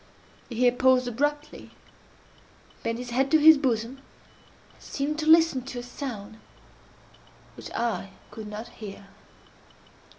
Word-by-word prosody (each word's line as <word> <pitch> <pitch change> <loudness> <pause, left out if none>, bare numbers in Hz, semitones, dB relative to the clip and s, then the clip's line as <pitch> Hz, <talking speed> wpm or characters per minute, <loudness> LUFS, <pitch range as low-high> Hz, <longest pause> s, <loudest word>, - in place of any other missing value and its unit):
He 240 - -7
here 245 +1 +4
paused 255 0 +3
abruptly, 290 +5 -3 1.1
bent 230 0 -2
his 245 0 -7
head 265 +3 +1
to 315 - +5
his 315 +1 +8
bosom, 255 -2 -2 0.7
and - - -25
seemed 300 +2 -3
to 310 - -2
listen 320 -4 +5
to 265 -2 -7
a 245 - -5
sound 225 -5 -7 1.2
which - - -9
I 230 -4 -2 0.2
could 220 -1 -8
not 210 +2 -7
hear. 200 -3 -10
250 Hz, 130 wpm, -26 LUFS, 230-285 Hz, 1.2 s, his